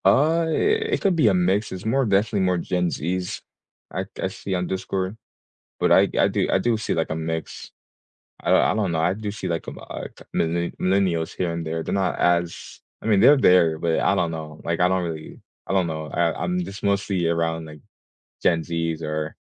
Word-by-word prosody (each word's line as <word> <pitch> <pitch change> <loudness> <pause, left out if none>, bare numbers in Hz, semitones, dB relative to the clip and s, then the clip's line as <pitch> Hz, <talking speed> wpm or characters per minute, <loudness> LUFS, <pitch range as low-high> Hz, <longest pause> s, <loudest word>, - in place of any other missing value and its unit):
Uh, 160 +5 +4
it 440 - +1
could 195 -3 +2
be 155 -8 +4
a 100 - +4
mix, 95 +4 +1
it's 95 +1 -7
more 130 +4 +2
definitely 105 0 +2
more 90 -1 +2
Gen 90 +1 0
Zs 90 +3 -3 0.5
I 95 +4 -2
c - - -24
I - - +2
see 95 0 -4
on 90 0 -1
Discord. 95 +1 -3 0.7
But, - - +2
I - - +6
I - - +4
do - - 0
I - - +4
do 120 -1 +1
see, 110 - -2
like, 80 - -1
a 80 - -1
mix. 80 0 -5 0.7
I - - 0
I - - +4
don't 105 -5 0
know, 80 - 0
I 90 +3 +2
do 105 0 -4
see, 100 -2 -5
like, 85 -2 -3
um, - - -7
uh, - - -6
c - - -13
millenn 85 +1 0
millennials, 90 -4 +1
here 90 -2 -1
and 85 0 -4
there, 80 +1 -2
they're - - -3
not 95 -2 0
as 85 -1 0 0.2
I - - -8
mean, 105 -3 +4
they're 140 +6 +7
there, 85 -8 +4
but 80 0 0
I - - +3
don't 85 - 0
know, 80 -1 -7
like, 85 +1 -2
I 90 - +5
don't 95 0 +1
really, 80 -2 -7 0.3
I - - -3
don't 95 -2 +2
know, 80 -1 -4
I 85 -1 +1
I'm 180 0 0
just 105 - -8
mostly 100 -3 0
around, 80 -1 0
like, 75 -1 -11 0.6
Gen 85 -2 +3
Zs 80 -1 -2
or, 75 0 -3
90 Hz, 220 wpm, -23 LUFS, 80-100 Hz, 0.7 s, they're